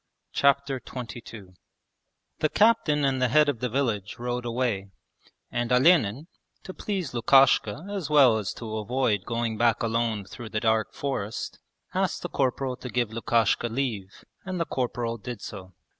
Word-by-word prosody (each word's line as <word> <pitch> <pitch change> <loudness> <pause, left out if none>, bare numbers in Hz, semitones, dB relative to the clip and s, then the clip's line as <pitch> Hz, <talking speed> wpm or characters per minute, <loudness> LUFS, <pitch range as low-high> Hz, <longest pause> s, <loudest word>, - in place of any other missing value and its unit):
Chapter 140 -1 +2
XXII 115 -3 -8 1.0
The 155 - +2
Captain 185 -10 +3
and 135 -1 0
the 130 - +4
head 150 +5 +4
of 140 -5 -1
the 125 - -1
village 110 -6 -1
rode 120 0 -3
away, 115 -5 -1 0.6
and 120 0 -2
Olenin, 130 - +4 0.4
to 185 - -8
please 185 -11 -3
Lukashka 135 - +4
as 200 -7 -4
well 135 -7 +6
as 100 - -3
to 110 -2 -5
avoid 110 -2 0
going 115 -2 -2
back 120 0 +3
alone 115 -3 0
through 115 +3 -9
the 105 - -1
dark 110 0 +1
forest, 115 -7 -4 0.3
asked - - -1
the - - -3
corporal 130 -1 -1
to 130 - -7
give 120 -1 -1
Lukashka 115 0 +1
leave, 110 -6 -4 0.2
and 185 -1 -4
the 165 - +1
corporal 120 -4 -2
did 120 +1 -6
so. 95 -3 -9
120 Hz, 155 wpm, -26 LUFS, 110-135 Hz, 1.0 s, well